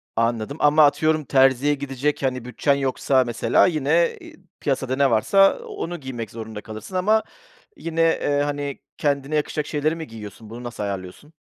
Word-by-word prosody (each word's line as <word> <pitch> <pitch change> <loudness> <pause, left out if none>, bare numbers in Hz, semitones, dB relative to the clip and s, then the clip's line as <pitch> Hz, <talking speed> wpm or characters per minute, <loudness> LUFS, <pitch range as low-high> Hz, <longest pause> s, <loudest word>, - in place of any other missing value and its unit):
Anladım 115 +4 -1
ama 150 +1 +5
atıyorum 155 +1 +2
terziye 135 +2 +3
gidecek, 140 +1 -2
hani, 130 -2 -1
bütçen 125 +3 +1
yoksa 135 -1 +1
mesela 120 -1 +2
yine, 160 +1 +1
eee, - - -12 0.2
piyasada 130 -2 -1
ne 140 -2 +3
varsa 195 - +4
onu 405 - -6
giymek 120 -6 -6
zorunda 110 -2 -7
kalırsın 110 - -9
ama 215 +4 +3 0.5
yine, 165 0 -2
eee, 145 -3 +2
hani, 145 -1 -3 0.2
kendine 145 0 -1
yakışacak 150 0 -1
şeyleri 155 +2 0
mi 160 -1 -7
giyiyorsun? 110 0 -10
Bunu 120 +2 -8
nasıl 120 -3 -5
ayarlıyorsun? 100 - -6
140 Hz, 155 wpm, -23 LUFS, 120-155 Hz, 0.5 s, ama